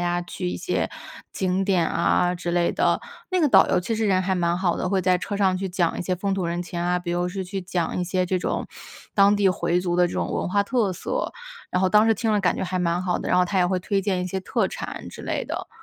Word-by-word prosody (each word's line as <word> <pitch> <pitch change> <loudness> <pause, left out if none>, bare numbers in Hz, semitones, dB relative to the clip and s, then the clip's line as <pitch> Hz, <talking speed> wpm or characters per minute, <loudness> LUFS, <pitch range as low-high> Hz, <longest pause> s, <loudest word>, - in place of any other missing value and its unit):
家 175 0 0
去 90 - -4
一 90 - -3
些 - - -1 0.4
景 190 +1 0
点 185 -4 +2
啊 175 +1 +2
之 175 -1 -4
类 175 -1 +2
的。 - - +2 0.3
那 370 - +1
个 315 - +4
导 - - +6
游 - - +3
其 180 +6 -2
实 220 0 0
人 185 -2 +2
还 190 0 0
蛮 170 -1 +1
好 180 -1 0
的， - - -1
会 190 0 +1
在 180 0 +3
车 200 +2 -4
上 190 -2 +2
去 195 - -3
讲 175 -2 0
一 - - -2
些 185 +1 -1
风 195 +2 -2
土 190 -3 -1
人 175 +1 -2
情 175 0 -5
啊， 180 +1 +1
比 175 -1 -4
如 175 0 0
是 190 +1 -4
去 195 +1 -4
讲 175 -1 -2
一 - - 0
些 180 +1 0
这 185 +1 0
种 - - -2 0.5
当 200 0 +5
地 200 -1 +2
回 175 0 0
族 180 -1 -1
的 180 - +4
这 175 - -6
种 - - -2
文 - - -1
化 200 +2 +2
特 220 -1 0
色。 - - -3 0.4
然 180 - 0
后 185 - +4
当 210 +2 +5
时 225 - +4
听 220 0 0
了 210 - +2
感 180 -2 +1
觉 - - -2
还 185 0 -2
蛮 175 0 0
好 180 -1 0
的， - - -4
然 180 - +3
后 180 - +5
他 190 +1 -1
也 180 - +4
会 185 +1 0
推 195 +2 0
荐 190 -2 -1
一 - - -3
些 190 +1 -3
特 185 - 0
产 - - -6
之 - - -10
类 - - -2
的。 - - -5
185 Hz, 305 characters per minute, -24 LUFS, 175-195 Hz, 0.5 s, 导